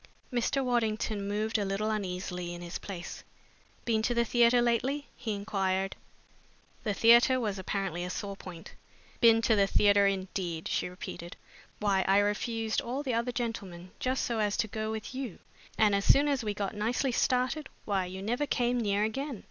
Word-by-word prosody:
Mr. 255 Hz, +3 st, +1 dB
Waddington 220 Hz, -4 st, 0 dB
moved 215 Hz, +2 st, 0 dB
a -, -, 0 dB
little 200 Hz, +2 st, -1 dB
uneasily 180 Hz, -3 st, -3 dB
in 175 Hz, -, -8 dB
his 175 Hz, +1 st, -5 dB
place. 180 Hz, -3 st, -7 dB, 0.6 s
"Been 225 Hz, -2 st, +2 dB
to 240 Hz, +2 st, 0 dB
the 235 Hz, 0 st, +3 dB
theatre 240 Hz, +1 st, +4 dB
lately?" 245 Hz, +5 st, +1 dB
he 220 Hz, -3 st, -3 dB
inquired. 195 Hz, -2 st, -1 dB, 0.9 s
The 210 Hz, -3 st, -1 dB
theatre 235 Hz, +4 st, +6 dB
was 210 Hz, -5 st, -2 dB
apparently 190 Hz, -2 st, -2 dB
a 180 Hz, -, -4 dB
sore 200 Hz, +2 st, -4 dB
point. 175 Hz, -4 st, -10 dB, 0.5 s
"Been 230 Hz, -1 st, +6 dB
to 225 Hz, -, +4 dB
the 200 Hz, -1 st, +4 dB
theatre, 200 Hz, 0 st, +4 dB
indeed!" 185 Hz, -4 st, -2 dB
she -, -, -1 dB
repeated. 175 Hz, -1 st, -8 dB, 0.4 s
"Why, 200 Hz, -2 st, +2 dB
I 195 Hz, +1 st, +5 dB
refused 220 Hz, +2 st, 0 dB
all 260 Hz, +4 st, -3 dB
the 260 Hz, -4 st, -1 dB
other 235 Hz, +2 st, 0 dB
gentlemen 195 Hz, -7 st, -5 dB
just 260 Hz, +1 st, 0 dB
so 235 Hz, -2 st, -1 dB
as 210 Hz, -1 st, +1 dB
to 220 Hz, -, +1 dB
go 215 Hz, +1 st, -3 dB
with 220 Hz, +3 st, -5 dB
you, 255 Hz, -7 st, -5 dB, 0.4 s
and 215 Hz, -2 st, +4 dB
as 200 Hz, 0 st, +2 dB
soon 285 Hz, +2 st, +6 dB
as 275 Hz, -4 st, 0 dB
we 210 Hz, -1 st, -2 dB
got 200 Hz, 0 st, -2 dB
nicely 240 Hz, +5 st, 0 dB
started, 255 Hz, +4 st, +1 dB, 0.2 s
why, 195 Hz, -3 st, 0 dB
you 190 Hz, +1 st, -7 dB
never 245 Hz, +7 st, -1 dB
came 245 Hz, -1 st, +1 dB
near 205 Hz, -2 st, +1 dB
again! 265 Hz, +2 st, -3 dB
215 Hz, 180 wpm, -30 LUFS, 195-240 Hz, 0.9 s, theatre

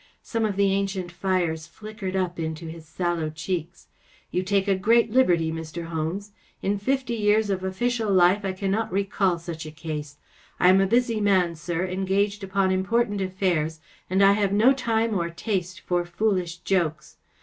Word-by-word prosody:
Some 225 Hz, -1 st, -1 dB
of 205 Hz, -2 st, -1 dB
the 200 Hz, 0 st, +3 dB
ancient 195 Hz, -2 st, -2 dB
fires 175 Hz, -3 st, -1 dB
flickered 210 Hz, 0 st, -7 dB
up 180 Hz, -2 st, -1 dB
into 160 Hz, 0 st, -4 dB
his 160 Hz, -1 st, -9 dB
sallow 170 Hz, -1 st, -1 dB
cheeks. 170 Hz, +2 st, -4 dB, 0.2 s
" -, -, -31 dB
You 180 Hz, -, 0 dB
take 195 Hz, +1 st, +1 dB
a 200 Hz, -, +4 dB
great 225 Hz, +4 st, +3 dB
liberty, 175 Hz, -10 st, +3 dB
Mr. 160 Hz, +1 st, -6 dB
Holmes. 170 Hz, +6 st, -3 dB, 0.3 s
In 200 Hz, +1 st, 0 dB
fifty 260 Hz, +2 st, -1 dB
years 210 Hz, -1 st, +2 dB
of 190 Hz, -1 st, -2 dB
official 220 Hz, +3 st, -1 dB
life 185 Hz, +2 st, +4 dB
I 190 Hz, -1 st, -1 dB
cannot 195 Hz, +3 st, -1 dB
recall 195 Hz, -1 st, +1 dB
such 165 Hz, -1 st, -7 dB
a -, -, -7 dB
case. 150 Hz, -2 st, -6 dB, 0.4 s
I 180 Hz, -, +6 dB
am 190 Hz, +1 st, +6 dB
a 195 Hz, -, +2 dB
busy 235 Hz, 0 st, +2 dB
man, 190 Hz, -4 st, +3 dB
sir, 170 Hz, +2 st, -3 dB
engaged 195 Hz, +2 st, 0 dB
upon 190 Hz, 0 st, +1 dB
important 205 Hz, +2 st, +1 dB
affairs, 180 Hz, -4 st, -1 dB, 0.3 s
and 190 Hz, +2 st, +3 dB
I 195 Hz, -, +7 dB
have 200 Hz, -1 st, +1 dB
no 220 Hz, +7 st, +5 dB
time 230 Hz, -3 st, 0 dB
or 170 Hz, -4 st, 0 dB
taste 185 Hz, 0 st, -3 dB
for 175 Hz, -1 st, 0 dB
foolish 180 Hz, -1 st, -1 dB
jokes. 165 Hz, -4 st, -1 dB
190 Hz, 175 wpm, -25 LUFS, 170-205 Hz, 0.4 s, I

